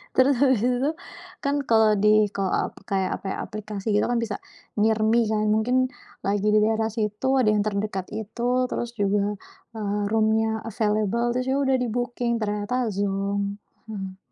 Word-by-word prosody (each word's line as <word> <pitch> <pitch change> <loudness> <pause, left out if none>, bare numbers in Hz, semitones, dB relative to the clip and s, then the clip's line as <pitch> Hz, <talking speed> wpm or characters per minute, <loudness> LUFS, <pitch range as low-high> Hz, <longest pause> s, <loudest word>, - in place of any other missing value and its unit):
Terus 265 +2 +5
habis 260 -6 +4
itu 245 0 +2
tuh, 305 +3 0 0.5
kan 280 +1 +1
kalau 220 -1 +5
di 210 +1 +4
kalau 195 -2 -1 0.2
ap - - -27
kayak 190 -2 0
apa - - -22
ya, - - -5
aplikasi 215 -1 -7
gitu 210 - +3
kan 240 0 +1
bisa 215 -3 -3 0.4
near 220 +1 +3
me 225 +2 +3
kan 215 0 0
mungkin 220 +4 +2 0.5
lagi 205 +1 +1
di 215 - +6
daerah 220 0 +1
situ 210 +2 -2
ada 220 -4 +4
yang 210 -1 +2
terdekat 200 -2 -2
itu, 220 +2 -4 0.2
terus 240 0 -4
juga 205 0 +1 0.4
eee, 210 -1 -2
room-nya 220 0 +2
available 215 +2 0
itu 255 - +1
juga 270 - +2 0.2
udah - - +5
di-booking 240 0 -2
ternyata 215 +4 -1
zonk, 200 0 -1 0.3
mhm. 190 -3 -6
215 Hz, 170 wpm, -25 LUFS, 205-235 Hz, 0.5 s, di